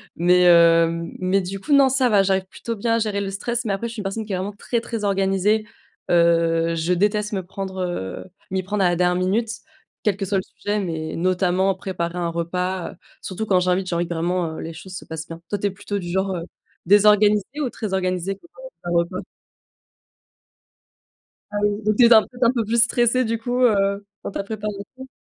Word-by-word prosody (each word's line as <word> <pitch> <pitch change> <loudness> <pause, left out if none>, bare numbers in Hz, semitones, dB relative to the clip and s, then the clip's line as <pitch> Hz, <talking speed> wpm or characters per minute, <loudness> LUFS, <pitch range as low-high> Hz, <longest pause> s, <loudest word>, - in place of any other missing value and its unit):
Mais 180 +1 +4
hem, 170 -1 +5
mais 185 +2 +1
du 190 +2 -5
coup, 290 +9 -1
non, 275 -1 +6
ça 260 -1 +2
va, 205 -4 +4
j'arrive 190 -1 +1
plutôt 230 +4 -6
bien 230 +2 +1
à - - +1
gérer 210 -2 -1
le 195 -1 -3
stress. 235 +4 -3
Mais 200 - 0
après, 230 +4 -3
je - - -8
suis 230 - -7
une - - -4
personne 205 +3 -3
qui 210 - -8
est 185 - 0
vraiment 195 +3 -4
très, 235 +3 -2
très 230 -2 -5
organisée, 195 +2 +1 0.4
heu, 165 -1 +3
je 165 +2 0
déteste 210 +3 0
me 190 - -2
prendre, 190 0 -5
heu, 175 - -4 0.3
m'y 190 0 -1
prendre 200 +1 -1
à - - +4
la 175 - +1
dernière 180 +1 +2
minute. 215 +5 0 0.5
Quel 210 -3 +2
que 200 - -5
soit 195 +1 0
le 190 - -1
sujet, 205 +1 -3
mais 160 -5 -4
notamment 185 +2 +1
préparer 180 -2 -4
un 170 - -1
repas, 180 +2 -2
heu, - - -15 0.3
surtout 195 +3 -4
quand 185 -3 +3
j'invite, 185 +1 0
j'ai 170 - -2
envie 170 0 0
que - - -3
vraiment, 170 0 -1
heu, - - -6
les 165 - -6
choses 180 +3 -10
se - - -7
passent 160 0 -7
bien. 165 0 -9
Toi, 205 - -1
tu 200 - -4
es 200 - -2
plutôt 200 +1 -4
du 175 -1 -6
genre, 190 +1 0
heu, 170 - -4 0.4
désorganisée 210 - +4
ou 260 - 0
très 215 -4 -5
organisée 185 0 -1
pour, 340 - -21
heu - - -8 0.2
ton 175 - -2
repas? 170 +2 -1 2.3
Ah 205 - -1
oui, 205 0 0
donc 215 0 +1
tu 245 - +7
es 235 - +7
un 220 - +8
peu - - -10
peut-être 250 0 -3
un - - +4
peu 235 -3 0
plus 230 +2 +2
stressée, 240 +2 +2
du 230 0 -1
coup, 245 +2 -2
heu, 200 -3 +2 0.2
dans - - -4
ta - - -3
préparation? 210 +5 -6
195 Hz, 230 wpm, -22 LUFS, 180-210 Hz, 2.3 s, un